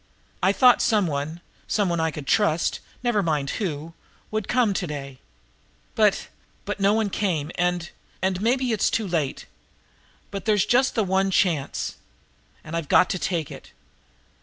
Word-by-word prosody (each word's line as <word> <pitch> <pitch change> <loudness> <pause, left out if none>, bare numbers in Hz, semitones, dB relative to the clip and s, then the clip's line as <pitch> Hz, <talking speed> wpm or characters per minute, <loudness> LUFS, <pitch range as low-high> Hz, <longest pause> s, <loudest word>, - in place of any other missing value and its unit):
I 190 +1 +4
thought 250 +4 +5
some 210 -3 +3
one, 155 +2 -3 0.3
some 205 -3 +1
one 170 -1 0
that 160 - +1
I - - +1
could 150 -2 -7
trust, 170 -2 +2 0.2
never 240 -4 +2
mind 150 -6 -1
who, 165 -3 -3 0.4
would 215 -2 -1
have - - -2
come 245 -5 +3
to 185 -2 -2
day, 140 -3 -7 0.7
but - - +2 0.4
but 205 0 -4
no 200 +1 +4
one 215 -2 0
came, 170 -7 -1
and 175 -1 -1 0.3
and 190 0 -1
maybe 250 +3 +1
now - - +1
it 215 - -2
s - - +3
too 220 -2 -1
late, 160 -6 -2 0.9
but 195 -2 -5
there's 210 -3 +3
just 260 +2 +2
the 225 - +2
one 190 0 +1
chance, 170 -7 0 0.7
and 160 +1 -6
I've 165 -4 -3
got 180 - +5
to 185 - -2
take 160 -1 -2
it." - - -11
185 Hz, 180 wpm, -24 LUFS, 160-210 Hz, 0.9 s, thought